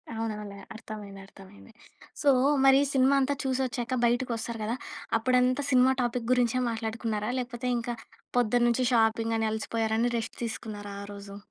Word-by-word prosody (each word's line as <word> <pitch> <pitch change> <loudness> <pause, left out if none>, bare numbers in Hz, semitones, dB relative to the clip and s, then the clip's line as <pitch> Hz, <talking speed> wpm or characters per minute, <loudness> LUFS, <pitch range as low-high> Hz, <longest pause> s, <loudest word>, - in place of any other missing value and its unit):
అవునవునులే. 210 -3 -5 0.2
అర్థమైంది. 205 -3 -9
అర్థమైంది. 195 +4 -15 0.5
సో, 290 - +4 0.4
మరి 270 0 +7
సినిమా 265 +1 +4
అంతా 280 +2 +1
చూసొచ్చాక, 255 -2 -1
బయటకి 245 +1 +1
వస్తారు 225 0 -5
కదా! 225 +3 -1 0.4
అప్పుడంతా 255 +3 +2
సినిమా 255 +1 +5
టాపిక్ 240 0 -2
గురించే 250 0 +2
మాట్లాడుకున్నారా? 225 -1 -2
లేకపోతే 250 0 -4
ఇంకా 235 0 -3 0.4
పొద్దున్నుంచి 240 +1 +3
షాపింగని 225 0 +2
అలసిపోయారని 225 +1 0
రెస్ట్ 225 - -5
తీసుకున్నారా 205 -2 -6
ఆ - - -7
రోజు? 200 0 -9
230 Hz, 130 wpm, -28 LUFS, 220-250 Hz, 0.5 s, మరి